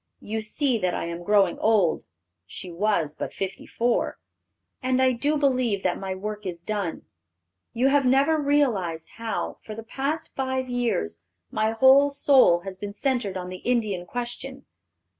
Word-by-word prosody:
You 220 +1 -4
see 245 +3 0
that 180 -2 0
I - - -2
am 170 0 -5
growing 200 -2 +3
old" 210 -7 +2 0.4
(she 180 - -8
was 170 -5 0
but - - -5
fifty 195 -1 -5
four), 235 0 0 0.6
"and 255 0 +1
I 260 0 +4
do 290 +5 0
believe 255 -8 +1
that 180 - 0
my 190 -1 -4
work 210 +2 -5
is 175 -3 -6
done. 200 -4 -3 0.7
You 250 +3 +3
have 285 0 +3
never 275 +5 +3
realized 230 - +1
how, 225 -1 -3
for 215 - -8
the 225 - -7
past 275 +7 -3
five 260 -1 -2
years, 235 - -1 0.3
my 215 +1 0
whole 265 +4 +6
soul 270 -11 +4
has 190 0 -8
been 205 0 -5
centered 235 -5 -1
on 180 0 -5
the 185 - -6
Indian 210 -6 -1
question. 245 +3 -6
225 Hz, 160 wpm, -25 LUFS, 190-260 Hz, 0.7 s, whole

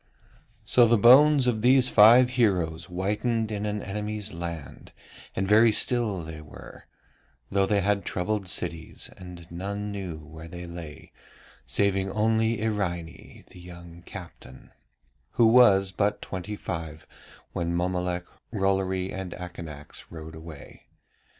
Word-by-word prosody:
So 120 -2 +5
the 115 +1 +4
bones 135 +5 +7
of 115 -3 0
these 125 +1 +5
five 120 +4 +7
heroes 90 -10 +1
whitened 105 +5 -1
in 105 0 -3
an 105 0 -3
enemy's 105 +1 -4
land, 85 -5 -7 0.4
and 95 - -1
very 110 +3 +6
still 110 -5 +1
they 80 -1 -8
were, 75 -4 -13 0.6
though 95 0 +2
they 100 -2 +2
had 100 +1 +1
troubled 95 +2 -2
cities, 85 -2 -3
and 90 -2 -11
none 100 +4 -4
knew 95 -5 -5
where 80 +2 -11
they 90 +1 -8
lay 85 -3 -10 0.6
saving 95 +5 0
only 110 +2 +1
Iraine, 85 -6 -4
the - - -13
young 85 -1 -12
captain, 85 -9 -12 0.6
who 115 - +4
was 100 -5 +6
but 100 +2 0
twenty 95 +3 -6
five 80 -5 -6 0.5
when 85 -1 -2
Mommolek, 90 0 -1 0.3
Rollory, 95 -2 0
and 95 -1 -5
Akanax 80 -5 -9
rode 80 -1 -9
away. 80 -3 -12
95 Hz, 130 wpm, -26 LUFS, 85-105 Hz, 0.6 s, bones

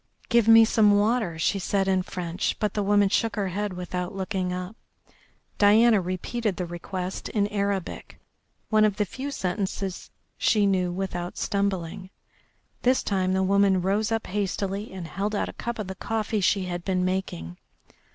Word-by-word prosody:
"Give 235 -2 +4
me 225 0 +9
some 210 -2 +4
water," 210 -5 +1
she 195 +5 +1
said 195 +1 0
in 190 -1 +2
French, 180 -1 -3
but 210 - -1
the 210 - -1
woman 205 0 +4
shook 220 +2 0
her 200 -3 -1
head 205 +2 -3
without 180 0 -4
looking 190 -1 -2
up. 180 +3 -5 0.8
Diana 215 +1 +6
repeated 185 +4 -2
the 180 - -2
request 180 +2 -5
in 205 -3 +1
Arabic, 200 -3 -3 0.5
one 215 -1 +4
of 210 -2 +3
the 210 - 0
few 260 +9 -6
sentences 190 -4 -3 0.3
she 210 -2 +3
knew 185 -2 +1
without 175 -1 -4
stumbling. 195 -2 -2 0.7
This 255 +1 +2
time 185 -2 0
the 190 0 +2
woman 195 0 +3
rose 205 +4 +1
up 225 0 -1
hastily 200 +1 -2
and 185 -3 -7
held 200 +6 -2
out - - -1
a - - -8
cup 235 0 -4
of 215 - -3
the 190 - -5
coffee 215 +1 -2
she 190 0 +2
had 175 -1 -4
been 185 -1 0
making. 90 - -3
195 Hz, 170 wpm, -26 LUFS, 185-210 Hz, 0.8 s, me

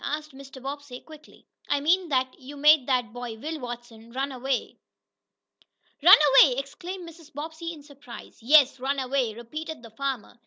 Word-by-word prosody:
asked 300 0 -4
Mr. 270 0 -12
Bobbsey 275 -1 -7
quickly. 310 -1 -16 0.2
"I 285 - +2
mean 345 +4 +2
that 260 -2 -1
you 280 +2 -11
made 300 -2 +5
that 250 -5 0
boy, 245 -2 -6
Will 310 +6 -5
Watson, 240 -2 -9
run 270 +2 -2
away." 260 0 -3 1.2
"Run 360 +6 +10 0.2
away!" 255 -3 +5
exclaimed 345 +6 -6
Mrs. 330 -2 -14
Bobbsey, 320 +2 -6
in 305 -3 -11
surprise. 280 -5 -13
"Yes, 275 +1 +5
run 275 +2 -1
away," 260 -4 -1
repeated 305 +5 -7
the 230 - -12
farmer. 255 -1 -5
275 Hz, 160 wpm, -26 LUFS, 250-305 Hz, 1.2 s, Run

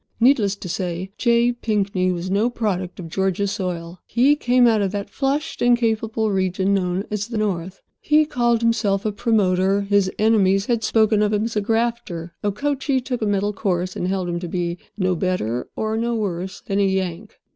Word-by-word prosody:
Needless 230 -5 +4
to 200 - -8
say 180 +1 -3
J. 235 0 +3
Pinkney 200 -6 0
was 180 +1 -4
no 210 +5 +2
product 190 -7 -3
of 170 - -6
Georgia 190 +3 0
soil. 180 -4 -4
He 265 +5 +4
came 250 -3 +3
out 225 -3 +4
of 195 -2 0
that 200 0 -4
flushed 285 +6 -2
and 245 0 +5
capable 220 -1 0
region 190 0 +1
known 185 0 0
as 210 0 -2
the 230 -2 -4
"North." 190 -3 -3 0.2
He 305 +1 +3
called 240 -5 +1
himself 215 -4 +1
a 215 - +1
"promoter"; 200 -3 +2
his 200 -1 +2
enemies 200 -3 +3
had 230 -2 0
spoken 215 0 +3
of 210 0 +1
him 210 0 +1
as 230 0 -3
a 210 - +1
"grafter"; 225 -6 -2
Okochee 270 +6 0
took 250 -1 -4
a 215 - 0
middle 205 +1 0
course, 185 -3 -1
and 180 - -2
held 185 -1 -1
him 175 0 -2
to 175 - -5
be 175 0 -3 0.2
no 185 -2 +1
better 160 - -2
nor 220 0 -1
no 235 +1 0
worse 190 -3 -3
than 195 0 -2
a - - +4
"Yank." 190 +1 -3
205 Hz, 190 wpm, -22 LUFS, 185-230 Hz, 0.2 s, and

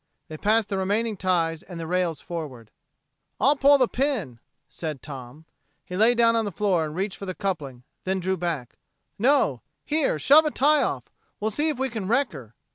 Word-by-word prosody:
They 155 - -7
passed 215 +4 +2
the 195 - -1
remaining 210 +4 0
ties 170 -4 0
and 180 -3 -9
the 165 - -4
rails 175 -2 0
forward. 135 -10 -7 0.7
"I'll 280 +3 +4
pull 285 +1 +6
the 255 -2 +3
pin," 235 - -2 0.3
said 155 -5 -6
Tom. 135 +1 -9 0.4
He 180 - -7
lay 225 +5 +4
down 230 -1 +4
on 225 - +2
the 205 - -3
floor 185 -3 +1
and 155 0 -6
reached 195 +2 -2
for 195 - -6
the 185 - -4
coupling; 150 -11 -4 0.2
then 190 +1 -1
he - - -4
drew 190 +2 0
back. 165 -9 -4 0.4
"No 245 - +3 0.2
here, 300 - +1
shove 295 - +6
a - - +2
tie 295 +1 +3
off. - - -3 0.3
Well 215 +1 -1
see 295 +9 0
if 300 - -2
we 265 +1 0
can 215 -5 -4
wreck 265 +5 +2
her." 120 -6 -11
190 Hz, 200 wpm, -25 LUFS, 160-235 Hz, 0.7 s, pull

